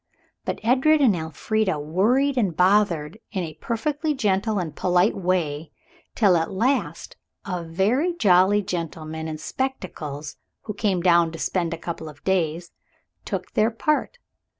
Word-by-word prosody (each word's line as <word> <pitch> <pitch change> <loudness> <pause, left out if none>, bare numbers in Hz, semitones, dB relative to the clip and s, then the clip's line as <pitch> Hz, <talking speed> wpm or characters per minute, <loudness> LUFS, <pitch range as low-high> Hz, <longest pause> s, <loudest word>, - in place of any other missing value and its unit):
But - - -3
Edred 270 +7 +4
and 245 -9 +4
Elfrida 170 +3 -1
worried 225 - +2
and 200 -10 0
bothered 185 -2 +2
in 190 -4 -2
a 160 -2 -6
perfectly 295 +6 -1
gentle 210 -3 0
and 165 -5 -3
polite 180 +3 +2
way 170 -5 -1 0.5
till 200 -5 +4
at 165 - -1
last 235 +8 -1 0.3
a 180 -4 -3
very 210 - +1
jolly 200 - +4
gentleman 160 -3 -4
in 155 -1 -4
spectacles, 155 - -5 0.3
who 210 - -5
came 200 -3 0
down 170 -2 +4
to - - -6
spend 170 0 -1
a 165 - -3
couple 165 -1 -6
of 145 -1 -15
days, 175 -2 0 0.5
took - - -4
their 215 +1 +2
part. 305 - -1
185 Hz, 145 wpm, -24 LUFS, 165-225 Hz, 0.5 s, Edred